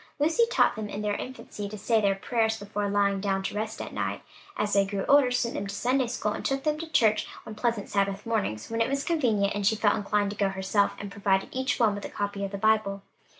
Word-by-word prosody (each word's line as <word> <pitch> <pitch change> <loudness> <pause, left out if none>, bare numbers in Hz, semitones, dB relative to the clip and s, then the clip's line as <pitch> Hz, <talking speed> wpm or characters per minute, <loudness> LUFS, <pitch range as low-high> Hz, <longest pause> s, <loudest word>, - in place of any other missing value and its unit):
Lucy 325 +11 +3
taught 475 - +3
them, 215 -1 -5
in 205 +1 -4
their 210 -1 0
infancy, 210 -4 -6
to 215 - -7
say 225 +2 +2
their 200 -1 +2
prayers 220 +2 0
before 205 0 -3
lying 200 -1 +2
down 195 -1 0
to - - -3
rest 220 +1 -3
at - - -6
night, - - -3 0.3
as 205 -1 0
they 200 0 +5
grew 195 0 -3
older 280 -2 +5
sent 245 -1 0
them 200 - -3
to 200 - -5
Sunday 255 +4 +1
school, 215 -3 -2
took 270 0 -1
them 305 0 0
to 325 0 -7
church 215 -6 +3 0.2
on 220 - -7
pleasant 225 -1 -1
Sabbath 200 0 -1
mornings, 205 - -2
when 230 0 0
it 230 - +2
was 275 +1 -1
convenient, 225 -12 +1
and 205 -1 0
she 220 - +4
felt 205 -1 +3
inclined 205 0 0
to - - -6
go 200 -1 +1
herself, 195 +1 +1
and 200 -1 -7
provided 195 -1 +1
each 260 +1 -1
one 225 -4 +4
with 205 0 -6
a - - -5
copy 200 0 -3
of 200 - -2
the 200 - -5
Bible. 205 -2 +1
210 Hz, 245 wpm, -27 LUFS, 200-235 Hz, 0.3 s, they